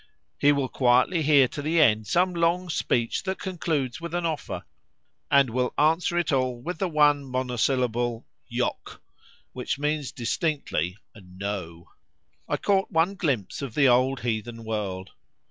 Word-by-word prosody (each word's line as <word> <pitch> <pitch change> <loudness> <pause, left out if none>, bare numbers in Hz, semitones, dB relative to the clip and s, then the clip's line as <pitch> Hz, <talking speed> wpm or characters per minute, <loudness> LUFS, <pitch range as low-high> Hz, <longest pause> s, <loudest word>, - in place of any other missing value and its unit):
He 145 - +5
will 140 -2 0
quietly 130 +7 +2
hear 145 -3 +5
to 145 - -6
the 160 +3 +1
end 110 -7 +4
some 180 - +2
long 170 +1 +1
speech 120 -7 0
that 190 -1 -3
concludes 160 -8 -2
with 170 0 -5
an 175 -1 -1
offer, 160 -2 -3 0.7
and 140 -3 +4
will 125 +1 -1
answer 165 +3 +2
it 175 -3 +1
all 130 -3 0
with 170 +6 -5
the 195 - 0
one 150 -3 +3
monosyllable 125 -2 -1 0.2
"Yok," - - -3 0.5
which - - -3
means 150 -1 -1
distinctly 120 - -2 0.2
"No." 90 -4 -7 0.6
I - - +1
caught 195 -1 +1
one 165 +4 +2
glimpse 140 - -2
of 135 -5 -6
the 140 -2 +5
old 130 +2 +2
heathen 115 0 -3
world. 100 -4 -4
135 Hz, 145 wpm, -26 LUFS, 120-160 Hz, 0.7 s, He